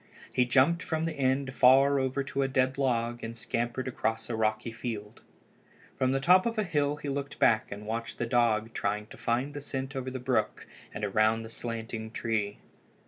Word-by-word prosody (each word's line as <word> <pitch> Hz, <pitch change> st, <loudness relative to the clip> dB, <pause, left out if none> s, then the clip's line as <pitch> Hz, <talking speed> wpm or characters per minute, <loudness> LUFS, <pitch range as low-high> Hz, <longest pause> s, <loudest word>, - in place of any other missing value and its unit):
He 125 Hz, -, +3 dB
jumped 135 Hz, +7 st, +3 dB
from 160 Hz, -1 st, -2 dB
the 165 Hz, -1 st, -1 dB
end 135 Hz, -1 st, 0 dB
far 135 Hz, +2 st, +6 dB
over 130 Hz, +1 st, 0 dB
to 135 Hz, 0 st, -2 dB
a 135 Hz, -, +2 dB
dead 130 Hz, 0 st, +1 dB
log 120 Hz, -3 st, 0 dB
and 115 Hz, +1 st, -5 dB
scampered 120 Hz, +3 st, -2 dB
across 115 Hz, -2 st, -2 dB
a -, -, -1 dB
rocky 110 Hz, +1 st, 0 dB
field. 115 Hz, -2 st, -6 dB, 0.7 s
From 130 Hz, -1 st, +1 dB
the 135 Hz, -, +1 dB
top 180 Hz, +8 st, +5 dB
of 230 Hz, -1 st, -2 dB
a 215 Hz, -, +2 dB
hill 145 Hz, -5 st, 0 dB
he 150 Hz, -, -8 dB
looked 140 Hz, 0 st, -3 dB
back 110 Hz, -1 st, +3 dB
and 100 Hz, +1 st, -7 dB
watched 115 Hz, +2 st, -4 dB
the 120 Hz, -, -1 dB
dog 115 Hz, -2 st, +2 dB
trying 105 Hz, +1 st, -1 dB
to -, -, -13 dB
find 125 Hz, +5 st, -1 dB
the 145 Hz, -, -6 dB
scent 135 Hz, -1 st, -5 dB
over 130 Hz, -1 st, -3 dB
the 130 Hz, -, -5 dB
brook 130 Hz, 0 st, -1 dB, 0.3 s
and 105 Hz, -, -3 dB
around 110 Hz, +2 st, +2 dB
the 110 Hz, -, -8 dB
slanting 115 Hz, -1 st, -5 dB
tree. 110 Hz, -3 st, -2 dB
125 Hz, 195 wpm, -29 LUFS, 115-135 Hz, 0.7 s, far